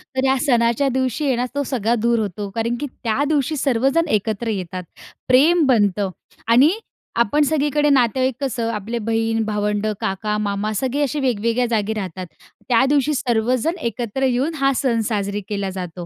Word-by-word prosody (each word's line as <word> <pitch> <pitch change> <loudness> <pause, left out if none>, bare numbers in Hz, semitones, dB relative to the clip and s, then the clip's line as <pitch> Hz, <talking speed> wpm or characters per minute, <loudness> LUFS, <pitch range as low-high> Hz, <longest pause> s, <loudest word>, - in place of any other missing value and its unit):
तर 260 0 +1
या 265 0 +3
सणाच्या 235 +1 +2
दिवशी 260 +2 -1
आहे 265 -3 +2
ना, 245 +1 0
तो 285 - 0
सगळा 240 -3 0
दूर 235 0 +2
होतो, 205 -1 -3
कारण 230 +1 -1
की 290 - -3 0.2
त्या 235 +4 +1
दिवशी 300 0 +1
सर्वजण 270 +5 +1
एकत्र 220 +3 -4
येतात. 185 -3 -4 0.4
प्रेम 300 +6 +5
बनतं 205 -5 +2 0.4
आणि 250 +7 +6 0.5
आपण 295 +8 +1
सगळीकडे 295 0 +1
नातेवाईक 260 -1 +2
कसं, 235 -4 -1
आपले 220 +3 -3
बहीण, 225 0 +1
भावंडं, 210 0 -1
काका, 210 +2 -1
मामा 205 0 -2
सगळे 260 +6 -1
असे 290 +1 -1
वेगवेगळ्या 235 -1 +1
जागी 220 -1 0
राहतात. 185 -3 -5 0.4
त्या 245 +1 +4
दिवशी 290 +1 +2
सर्वजण 250 +5 0
एकत्र 235 +2 -3
येऊन 260 +5 0
हा 275 0 +3
सण 240 -3 +1
साजरी 205 -1 -2
केला 200 -2 -2
जातो. 180 -2 -6
235 Hz, 165 wpm, -20 LUFS, 210-270 Hz, 0.5 s, आणि